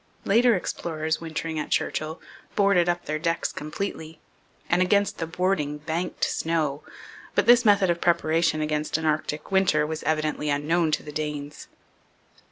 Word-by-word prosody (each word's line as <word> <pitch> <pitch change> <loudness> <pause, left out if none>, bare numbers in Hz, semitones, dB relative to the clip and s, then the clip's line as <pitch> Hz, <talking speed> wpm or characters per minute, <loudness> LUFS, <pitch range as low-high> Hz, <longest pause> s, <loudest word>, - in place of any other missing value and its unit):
Later 235 +3 +4
explorers 160 -3 -3
wintering 160 -1 -4
at 150 - -4
Churchill 155 +1 -1 0.4
boarded 195 -4 +3
up 175 0 -1
their 155 +1 -2
decks 165 +1 -1
completely 160 0 -5 0.5
and 175 +2 +2
against 200 +2 +2
the 165 - -2
boarding 165 -4 -1
banked 160 +4 -4
snow, 155 -3 0 0.5
but 205 - +3
this 240 +1 +7
method 200 -3 +5
of 170 - -3
preparation 165 -2 +2
against 150 0 -1
an 160 - -4
Arctic 155 0 -1
winter 185 -6 +3
was 155 0 -4
evidently 155 -1 -1
unknown 155 +4 +1
to - - 0
the 150 - -8
Danes. 150 -1 -5
160 Hz, 150 wpm, -25 LUFS, 155-180 Hz, 0.5 s, this